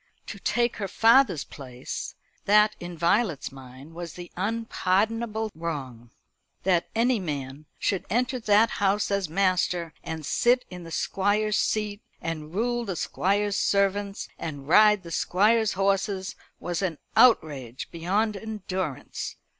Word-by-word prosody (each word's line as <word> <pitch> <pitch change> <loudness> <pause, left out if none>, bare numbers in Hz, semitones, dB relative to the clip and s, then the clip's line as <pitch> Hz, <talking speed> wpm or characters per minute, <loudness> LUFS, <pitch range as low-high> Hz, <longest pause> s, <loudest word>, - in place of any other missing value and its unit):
To 200 - -8
take 235 +4 0
her 200 - -3
father's 225 - +4
place; 125 -3 -7 0.3
that 210 +1 +5
in 175 -1 -7
Violet's 170 - +1
mind 135 +3 -12
was 170 -1 -7
the 175 -1 -10
unpardonable 220 +1 0
wrong. 135 -8 -6 0.5
That 175 -2 +2
any 235 +1 +3
man 145 -4 -5
should 195 - -1
enter 250 +3 0
that 220 0 +4
house 200 +1 +2
as 200 -4 0
master, 180 -2 +1
and 160 -2 -5
sit 245 - +2
in 180 -1 -8
the 165 - -9
Squire's 205 +5 +1
seat, 210 -1 -1 0.2
and 155 -2 -5
rule 240 +3 0
the 195 -5 -4
Squire's 200 +4 0
servants, 200 0 0
and 145 -4 -6
ride 210 +3 +6
the 170 - -9
Squire's 215 +6 +2
horses, 195 0 0 0.2
was 175 0 -3
an 175 -5 -1 0.2
outrage 140 - +3
beyond 200 +6 0
endurance. 190 -7 -4
195 Hz, 130 wpm, -26 LUFS, 165-215 Hz, 0.5 s, ride